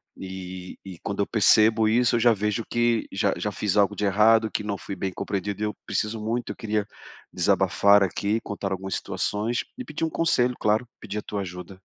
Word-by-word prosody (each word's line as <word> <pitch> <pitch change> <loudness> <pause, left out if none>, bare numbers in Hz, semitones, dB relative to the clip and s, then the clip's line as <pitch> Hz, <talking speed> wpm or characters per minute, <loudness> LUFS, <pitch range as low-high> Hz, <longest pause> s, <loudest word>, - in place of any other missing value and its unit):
E 95 -1 -8
e 95 -3 -8
quando 100 +1 -5
eu - - 0
percebo 110 0 +5
isso, 120 +1 +3
eu - - +2
já 120 0 +6
vejo 105 +2 -1
que 120 -1 +1
já - - +1
já - - -2
fiz 105 -3 -1
algo 100 -2 +4
de 105 - -1
errado, 110 +3 +4
que 105 - -2
não 100 -2 -3
fui 100 - -7
bem 95 -1 -3
compreendido, 100 +2 -4
e - - +2
eu 105 - -3
preciso 110 +1 -2
muito 115 +3 -2
Eu - - -7
queria 105 -2 -2 0.5
desabafar 100 0 +4
aqui, 100 +4 0
contar 100 -2 -5
algumas 95 0 -3
situações, 110 +4 -2
e 255 - -5
pedir 155 -4 -3
um - - -1
conselho, 125 -8 +1
claro, 110 +3 +1
pedir 105 -1 -6
a - - -5
tua 105 -1 -4
ajuda. 90 +1 -8
105 Hz, 205 wpm, -25 LUFS, 100-115 Hz, 0.5 s, já